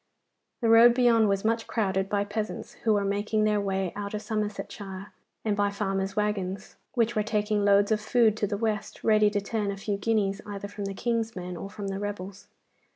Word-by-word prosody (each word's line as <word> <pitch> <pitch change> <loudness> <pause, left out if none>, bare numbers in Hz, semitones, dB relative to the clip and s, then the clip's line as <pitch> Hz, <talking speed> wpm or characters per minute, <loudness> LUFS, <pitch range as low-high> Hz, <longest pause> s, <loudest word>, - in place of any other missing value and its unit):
The 230 - +2
road 235 +1 +8
beyond 230 -4 +4
was 195 +1 0
much 225 +1 +1
crowded 195 -3 0
by 205 -1 +1
peasants, 210 +1 -4
who 220 - +4
were 200 -1 +1
making 205 +2 0
their 210 -1 +2
way 195 -2 -1
out 205 0 -4
of 210 - -4
Somersetshire, 205 -2 -5 0.3
and 210 -2 +1
by 205 0 +2
farmers' 195 -1 -2
waggons, 200 -2 -2 0.2
which 235 -1 +2
were 215 - +2
taking 210 -1 0
loads 200 +1 +4
of 215 -1 +2
food 220 -1 +3
to 210 - 0
the 205 - -2
West, 215 -1 -3
ready 215 -1 +5
to 205 0 0
turn 205 0 -2
a 200 - -3
few 200 +1 -2
guineas 200 -1 0
either 200 -1 -6
from 205 0 -6
the 195 0 -4
King's 230 0 -1
men 180 -1 -5
or 195 +4 -6
from 200 -1 -6
the 195 0 -3
rebels. 200 -1 -6
205 Hz, 205 wpm, -27 LUFS, 200-220 Hz, 0.3 s, road